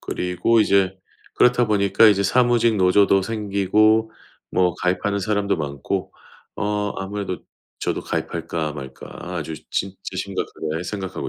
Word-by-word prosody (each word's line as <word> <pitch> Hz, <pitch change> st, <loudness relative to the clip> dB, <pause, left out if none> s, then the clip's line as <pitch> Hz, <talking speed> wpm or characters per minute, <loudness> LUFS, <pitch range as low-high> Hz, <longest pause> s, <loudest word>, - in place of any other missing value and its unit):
그리고 90 Hz, +6 st, 0 dB
이제 95 Hz, -3 st, +3 dB, 0.4 s
그렇다 125 Hz, 0 st, +4 dB
보니까 100 Hz, +1 st, +4 dB
이제 100 Hz, -2 st, +4 dB
사무직 120 Hz, +1 st, +3 dB
노조도 95 Hz, +1 st, +4 dB
생기고 110 Hz, +1 st, +2 dB, 0.4 s
뭐 90 Hz, -2 st, +2 dB
가입하는 100 Hz, +3 st, 0 dB
사람도 100 Hz, -1 st, 0 dB
많고 75 Hz, +5 st, -3 dB, 0.4 s
어 105 Hz, 0 st, -1 dB
아무래도 95 Hz, -2 st, -4 dB, 0.4 s
저도 -, -, -2 dB
가입할까 85 Hz, -2 st, -3 dB
말까 65 Hz, -2 st, -9 dB, 0.3 s
아주 80 Hz, -1 st, -4 dB, 0.2 s
진짜 95 Hz, 0 st, -2 dB, 0.2 s
심각하게 85 Hz, -4 st, -3 dB
생각하고 95 Hz, 0 st, -5 dB
100 Hz, 305 characters per minute, -22 LUFS, 90-105 Hz, 0.4 s, 그렇다